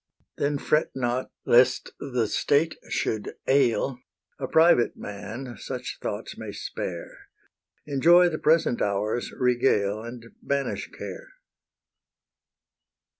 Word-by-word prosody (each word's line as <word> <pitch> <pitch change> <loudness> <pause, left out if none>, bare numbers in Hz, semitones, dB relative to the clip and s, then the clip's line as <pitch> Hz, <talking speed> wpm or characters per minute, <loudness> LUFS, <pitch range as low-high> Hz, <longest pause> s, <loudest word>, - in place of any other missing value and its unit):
Then 145 0 +1
fret 150 +2 +1
not 125 0 -1 0.2
lest 125 +1 +4
the 125 -4 -1
state 145 +8 +2 0.2
should 110 -2 -2
ail; 135 -1 +2 0.4
A 135 - -3
private 160 -6 +4
man 110 +5 -7
such - - -6
thoughts - - -4
may - - -6
spare; - - -6 0.6
Enjoy 170 +5 +5
the 155 -3 -2
present 160 -6 +3
hour's 105 +4 -1
regale, 120 -5 +1
And 115 0 -8 0.2
banish 140 0 -2
care. - - -8
125 Hz, 105 wpm, -26 LUFS, 115-145 Hz, 0.6 s, Enjoy